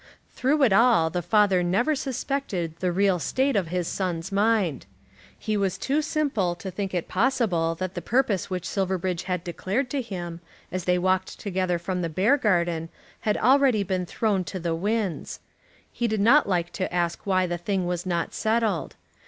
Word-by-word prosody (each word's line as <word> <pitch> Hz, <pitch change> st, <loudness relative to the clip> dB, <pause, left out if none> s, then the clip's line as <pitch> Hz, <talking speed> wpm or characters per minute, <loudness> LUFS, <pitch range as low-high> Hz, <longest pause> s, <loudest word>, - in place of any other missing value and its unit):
Through 280 Hz, +3 st, +2 dB
it 230 Hz, -7 st, +5 dB
all 220 Hz, -7 st, +4 dB
the 175 Hz, -, -1 dB
father 200 Hz, 0 st, +3 dB
never 195 Hz, -, +1 dB
suspected 260 Hz, -, -3 dB
the 185 Hz, -1 st, 0 dB
real 190 Hz, 0 st, +2 dB
state 265 Hz, -, 0 dB
of 190 Hz, -4 st, +1 dB
his 175 Hz, 0 st, -2 dB
son's 180 Hz, -1 st, -3 dB
mind. 200 Hz, -, +1 dB, 0.5 s
He 215 Hz, 0 st, -2 dB
was 195 Hz, -3 st, 0 dB
too 285 Hz, +3 st, 0 dB
simple 275 Hz, -, 0 dB
to 190 Hz, +2 st, -7 dB
think 190 Hz, 0 st, -4 dB
it 175 Hz, -, -2 dB
possible 190 Hz, -8 st, +1 dB
that 185 Hz, +2 st, -4 dB
the 175 Hz, -, -4 dB
purpose 225 Hz, -2 st, +1 dB
which 180 Hz, -2 st, -3 dB
Silverbridge 185 Hz, -2 st, -1 dB
had 180 Hz, -2 st, -2 dB
declared 200 Hz, +9 st, -2 dB
to 280 Hz, -, 0 dB
him 175 Hz, -7 st, -6 dB, 0.3 s
as 185 Hz, -1 st, -3 dB
they 180 Hz, 0 st, +3 dB
walked 185 Hz, +1 st, 0 dB
together 185 Hz, -3 st, -1 dB
from 180 Hz, +2 st, -3 dB
the 170 Hz, -, -2 dB
Beargarden 175 Hz, -, +1 dB, 0.3 s
had 210 Hz, -1 st, 0 dB
already 260 Hz, -4 st, +4 dB
been 185 Hz, -2 st, -2 dB
thrown 200 Hz, -1 st, 0 dB
to 190 Hz, -, -5 dB
the 170 Hz, -1 st, -1 dB
winds. 205 Hz, +1 st, -2 dB, 0.5 s
He 240 Hz, -, -1 dB
did 215 Hz, -1 st, -1 dB
not 235 Hz, +5 st, +5 dB
like 175 Hz, -2 st, 0 dB
to 185 Hz, -, -3 dB
ask 175 Hz, +1 st, -2 dB
why 185 Hz, -1 st, +3 dB
the 175 Hz, -1 st, -3 dB
thing 190 Hz, +1 st, -1 dB
was 175 Hz, 0 st, -2 dB
not 170 Hz, -3 st, -2 dB
settled. 220 Hz, -5 st, 0 dB
190 Hz, 175 wpm, -25 LUFS, 175-220 Hz, 0.5 s, it